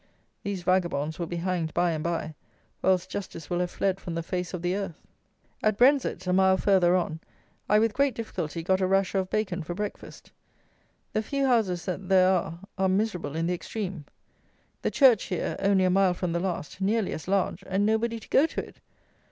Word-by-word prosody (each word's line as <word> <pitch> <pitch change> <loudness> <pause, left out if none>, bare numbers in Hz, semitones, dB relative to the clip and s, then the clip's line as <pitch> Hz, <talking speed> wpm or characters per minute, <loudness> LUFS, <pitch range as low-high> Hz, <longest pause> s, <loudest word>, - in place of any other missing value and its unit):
These 200 -3 -4
vagabonds 175 -4 0
will 170 - -2
be 175 - -4
hanged 170 -2 -2
by 175 0 +2
and 155 -1 -3
by, 165 -1 -2 0.5
or - - +2
else 185 -1 +3
justice 185 -5 -7
will 175 - +1
have 180 0 0
fled 195 +1 -1
from 170 -3 -6
the 165 - -2
face 180 0 -3
of 180 -2 -5
the 175 +1 0
earth. 195 -5 -4 0.7
At 215 -1 +2
Brenzett 250 -7 +3
(a 180 - +1
mile 190 0 +4
further 185 -3 +4
on) 160 -3 -1 0.5
I 210 - +5
with 220 0 +2
great 275 -1 +1
difficulty 170 -7 -4
got 190 +2 +1
a 185 - +2
rasher 195 0 +2
of 185 -1 -3
bacon 190 -4 -1
for 170 +2 -5
breakfast. 205 +1 -7 0.8
The 215 - +1
few 275 +5 -1
houses 215 -9 +1
that 185 0 -4
there 185 -1 +6
are 170 -2 -1 0.2
are 190 0 +3
miserable 185 -7 -1
in 165 +1 0
the 180 - 0
extreme. 190 -3 -5 0.8
The - - 0
church 255 -7 +5
here 180 - -2
(only 195 -1 +3
a 185 - +3
mile 190 -1 +3
from 180 -1 -2
the 170 - 0
last) 185 0 -4
nearly 210 +1 +1
as 155 - -7
large; 195 -1 0
and 195 +2 +1
nobody 225 +2 +1
to - - -16
go 295 - +5
to - - -5
it. - - -17
185 Hz, 205 wpm, -27 LUFS, 175-200 Hz, 0.8 s, there